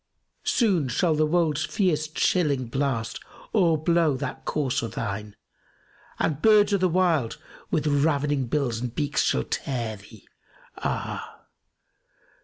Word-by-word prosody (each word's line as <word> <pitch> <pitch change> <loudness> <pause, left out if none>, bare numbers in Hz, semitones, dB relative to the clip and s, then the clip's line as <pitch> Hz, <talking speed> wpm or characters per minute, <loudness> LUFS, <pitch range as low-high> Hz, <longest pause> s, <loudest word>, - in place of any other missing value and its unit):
Soon 190 - +2
shall 160 +7 +1
the 155 0 +2
wold's 155 -2 +1
fierce 155 -4 0
chilling 150 -4 +1
blast 120 -2 -2 0.3
o'erblow 165 - +3
that - - -5
corse 140 -5 0
o' 115 - -3
thine; 105 -2 -5 0.4
* - - -29
And 150 -1 0
birds 210 -1 +5
o' - - +4
the 185 -1 +2
wild 165 -9 +1 0.3
with 155 -3 0
ravening 145 -2 +1
bills 125 -4 -1
and 125 -1 -4
beaks 145 -2 0
shall 65 - +1
tear 115 - -3
thee, 100 +1 -16 0.5
ah! - - -4
150 Hz, 130 wpm, -25 LUFS, 125-165 Hz, 0.5 s, birds